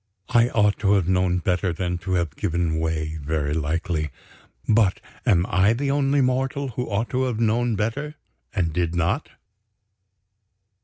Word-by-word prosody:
I 120 Hz, +1 st, +4 dB
ought 105 Hz, -3 st, +2 dB
to 100 Hz, 0 st, +3 dB
have 95 Hz, -4 st, +2 dB
known 90 Hz, -1 st, +2 dB
better 90 Hz, +1 st, 0 dB
than 90 Hz, +1 st, -2 dB
to 95 Hz, +2 st, -3 dB
have 85 Hz, -4 st, 0 dB
given 85 Hz, -4 st, -1 dB
way. 80 Hz, -1 st, -2 dB
Very 75 Hz, 0 st, -1 dB
likely. 80 Hz, 0 st, -1 dB, 0.6 s
But 105 Hz, -4 st, +3 dB, 0.3 s
am 85 Hz, -1 st, +4 dB
I 95 Hz, +4 st, +3 dB
the 135 Hz, +3 st, -1 dB
only 140 Hz, 0 st, +2 dB
mortal 135 Hz, +2 st, 0 dB
who 125 Hz, +1 st, -4 dB
ought 105 Hz, +3 st, -1 dB
to 130 Hz, 0 st, +1 dB
have 120 Hz, -4 st, -2 dB
known 115 Hz, +1 st, +1 dB
better 125 Hz, +9 st, -2 dB, 0.4 s
and 85 Hz, -4 st, -1 dB
did 85 Hz, 0 st, -1 dB
not? 85 Hz, -, 0 dB
95 Hz, 155 wpm, -24 LUFS, 85-120 Hz, 0.6 s, I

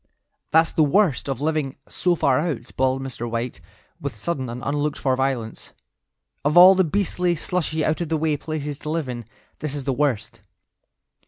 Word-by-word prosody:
"That's 160 Hz, +1 st, +4 dB
the -, -, +1 dB
worst 155 Hz, -, +2 dB
of 135 Hz, -1 st, -3 dB
living 150 Hz, -3 st, -1 dB
so 180 Hz, -1 st, +1 dB
far 135 Hz, -4 st, +2 dB
out," 150 Hz, -8 st, -3 dB
bawled 130 Hz, 0 st, +1 dB
Mr. 120 Hz, -3 st, -4 dB
White, 115 Hz, +1 st, -3 dB, 0.4 s
with -, -, -4 dB
sudden 130 Hz, +2 st, -3 dB
and 120 Hz, +1 st, -6 dB
unlooked 145 Hz, +1 st, -1 dB
for 130 Hz, -2 st, +1 dB
violence; 130 Hz, -4 st, -3 dB, 0.7 s
"of 150 Hz, +4 st, +2 dB
all 185 Hz, +2 st, +10 dB
the 190 Hz, 0 st, +3 dB
beastly, 180 Hz, 0 st, 0 dB
slushy, 160 Hz, -2 st, -1 dB
out 155 Hz, +2 st, 0 dB
of 170 Hz, -, -3 dB
the 160 Hz, -, +1 dB
way 155 Hz, -1 st, +1 dB
places 150 Hz, -1 st, -4 dB
to 150 Hz, -, -6 dB
live 160 Hz, -2 st, -1 dB
in, 120 Hz, -2 st, -5 dB, 0.3 s
this 150 Hz, -1 st, -4 dB
is 140 Hz, -, -4 dB
the 135 Hz, 0 st, 0 dB
worst. 120 Hz, -5 st, -1 dB
145 Hz, 180 wpm, -23 LUFS, 130-160 Hz, 0.7 s, all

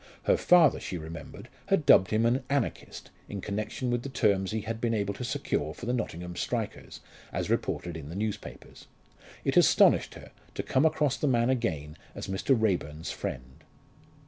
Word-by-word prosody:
Her -, -, +4 dB
father, 175 Hz, -5 st, +5 dB
she 90 Hz, -, -5 dB
remembered, 80 Hz, +1 st, -9 dB, 0.2 s
had -, -, +2 dB
dubbed 95 Hz, -, +6 dB
him 110 Hz, +1 st, +2 dB
an 125 Hz, +3 st, +2 dB
"Anarchist" 140 Hz, 0 st, -3 dB, 0.2 s
in 100 Hz, -, -5 dB
connection 105 Hz, +5 st, -3 dB
with 120 Hz, 0 st, 0 dB
the 140 Hz, -, -6 dB
terms 100 Hz, -7 st, +1 dB
he 110 Hz, 0 st, -2 dB
had 110 Hz, +2 st, -5 dB
been 115 Hz, -1 st, +1 dB
able 100 Hz, -1 st, -1 dB
to 125 Hz, -, -7 dB
secure 80 Hz, -9 st, -2 dB
for -, -, -8 dB
the 120 Hz, -, 0 dB
Nottingham 90 Hz, -7 st, -4 dB
strikers, -, -, -4 dB, 0.3 s
as -, -, -2 dB
reported 85 Hz, -2 st, -1 dB
in 75 Hz, -3 st, -7 dB
the 85 Hz, -, -7 dB
newspapers. 105 Hz, +1 st, -6 dB, 0.6 s
It -, -, +1 dB
astonished -, -, +5 dB
her -, -, -12 dB, 0.2 s
to -, -, -2 dB
come 135 Hz, +5 st, +3 dB
across 150 Hz, -4 st, +1 dB
the 150 Hz, -, 0 dB
man 120 Hz, -1 st, +3 dB
again 80 Hz, -, -2 dB, 0.2 s
as -, -, -5 dB
Mr. 105 Hz, +6 st, +1 dB
Raeburn's 80 Hz, -8 st, -1 dB
friend. 65 Hz, +1 st, -6 dB
110 Hz, 175 wpm, -28 LUFS, 90-125 Hz, 0.6 s, dubbed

